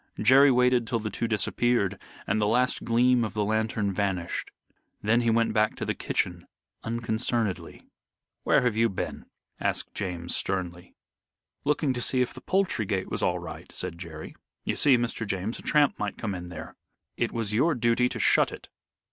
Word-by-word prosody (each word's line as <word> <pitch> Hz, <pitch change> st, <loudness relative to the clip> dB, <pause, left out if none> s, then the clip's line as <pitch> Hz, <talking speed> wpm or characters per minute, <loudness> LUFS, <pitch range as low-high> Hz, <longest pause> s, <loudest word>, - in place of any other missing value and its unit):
Jerry 135 Hz, +5 st, +7 dB
waited 125 Hz, -2 st, +3 dB
till 120 Hz, -, 0 dB
the 110 Hz, -1 st, -4 dB
two 115 Hz, -, -2 dB
disappeared 105 Hz, -1 st, +1 dB, 0.2 s
and 110 Hz, +2 st, 0 dB
the 105 Hz, -, +2 dB
last 125 Hz, +4 st, +1 dB
gleam 120 Hz, +1 st, +3 dB
of 110 Hz, -, -4 dB
the 105 Hz, -1 st, +1 dB
lantern 110 Hz, -1 st, 0 dB
vanished. 95 Hz, -3 st, -2 dB, 0.5 s
Then 115 Hz, +3 st, +3 dB
he 120 Hz, -, +1 dB
went 115 Hz, 0 st, +2 dB
back 110 Hz, 0 st, +2 dB
to -, -, -4 dB
the -, -, 0 dB
kitchen -, -, -2 dB, 0.4 s
unconcernedly. 115 Hz, -2 st, -2 dB, 0.6 s
"Where -, -, +3 dB
have 120 Hz, -3 st, +1 dB
you 115 Hz, +1 st, +3 dB
been?" 95 Hz, -, -5 dB, 0.3 s
asked -, -, -1 dB
James, 90 Hz, -4 st, -2 dB
sternly. 90 Hz, -2 st, -3 dB, 0.7 s
"Looking 150 Hz, -1 st, +1 dB
to 120 Hz, -, -3 dB
see 130 Hz, -, +1 dB
if 125 Hz, -, -1 dB
the 130 Hz, -, -11 dB
poultry 185 Hz, -, 0 dB
gate 95 Hz, -1 st, -2 dB
was -, -, 0 dB
all -, -, +1 dB
right," -, -, -9 dB
said 85 Hz, -, -5 dB
Jerry. 80 Hz, -3 st, -8 dB, 0.3 s
"You -, -, -1 dB
see, 140 Hz, -4 st, +5 dB
Mr. 115 Hz, -2 st, -2 dB
James, 100 Hz, +3 st, -2 dB
a -, -, -8 dB
tramp 150 Hz, -2 st, +2 dB
might 105 Hz, -1 st, -3 dB
come 105 Hz, -3 st, -3 dB
in 90 Hz, -1 st, -6 dB
there." 90 Hz, -, -8 dB, 0.4 s
"It -, -, -1 dB
was 115 Hz, -3 st, -2 dB
your 155 Hz, +8 st, +3 dB
duty 120 Hz, +1 st, +2 dB
to -, -, -5 dB
shut -, -, +4 dB
it." -, -, -10 dB
115 Hz, 180 wpm, -27 LUFS, 100-125 Hz, 0.7 s, Jerry